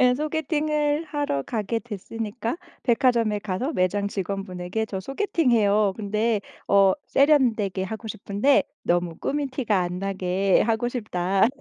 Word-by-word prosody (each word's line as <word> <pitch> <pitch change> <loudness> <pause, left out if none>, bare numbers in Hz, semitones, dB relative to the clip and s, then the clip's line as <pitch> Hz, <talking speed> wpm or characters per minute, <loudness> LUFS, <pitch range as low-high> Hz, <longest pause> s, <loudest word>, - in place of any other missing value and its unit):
예 250 -1 +5
소개팅을 300 0 0
하러 290 - -2
가게 225 - -2
됐으니까 225 - -5 0.3
백화점에 235 -4 +2
가서 210 - -3
매장 200 - +1
직원분에게 195 +1 -3
저 195 - -4
소개팅해요 225 - +2
근데 215 +1 0 0.3
어 195 -1 +5
세련되게 235 -10 +3
하고 220 +3 -6
싶은데 215 +6 +2 0.2
너무 175 -1 0
꾸민 290 0 -1
티가 240 -7 0
안 180 0 -2
나게 190 0 +1
하고 225 +2 0
싶다. 195 -5 +1
215 Hz, 295 characters per minute, -25 LUFS, 195-260 Hz, 0.3 s, 예